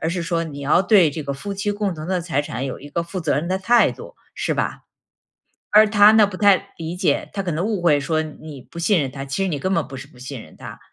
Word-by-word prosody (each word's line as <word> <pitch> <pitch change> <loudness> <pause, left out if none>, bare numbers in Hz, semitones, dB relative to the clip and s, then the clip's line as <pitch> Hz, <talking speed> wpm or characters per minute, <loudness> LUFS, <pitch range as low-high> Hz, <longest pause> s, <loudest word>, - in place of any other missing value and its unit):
而 160 - -1
是 170 0 -2
说 165 -1 -1
你 145 -3 -8
要 145 +6 +3
对 185 -5 +4
这 155 +1 -5
个 140 0 -4
夫 200 +9 -6
妻 200 +1 -2
共 205 -2 -2
同 155 0 -7
的 185 -1 -1
财 160 -4 -1
产 135 -3 -5
有 130 - -5
一 145 - -10
个 170 +3 -2
负 180 +2 -6
责 160 -3 0
任 155 - -2
的 185 +2 -1
态 235 +5 +4
度， - - -12 0.2
是 - - -1
吧？ - - -3 0.9
而 215 +1 +7
他 210 0 +6
呢， 220 -1 +6
不 200 -2 -6
太 200 -2 +3
理 165 +1 -5
解， 180 0 0
他 195 -1 -3
可 175 - -2
能 160 +3 -2
误 210 -2 -1
会 150 -4 +4
说 155 +3 -1
你 155 -2 -10
不 170 +6 -11
信 180 +1 +2
任 135 -3 -2
他， 135 0 -6
其 140 +8 -2
实 - - 0
你 150 -5 -2
根 185 +7 -2
本 195 - 0
不 135 - -9
是 130 - -9
不 125 - -21
信 130 -1 -8
任 80 - -16
他。 - - -10
170 Hz, 300 characters per minute, -21 LUFS, 145-195 Hz, 0.9 s, 而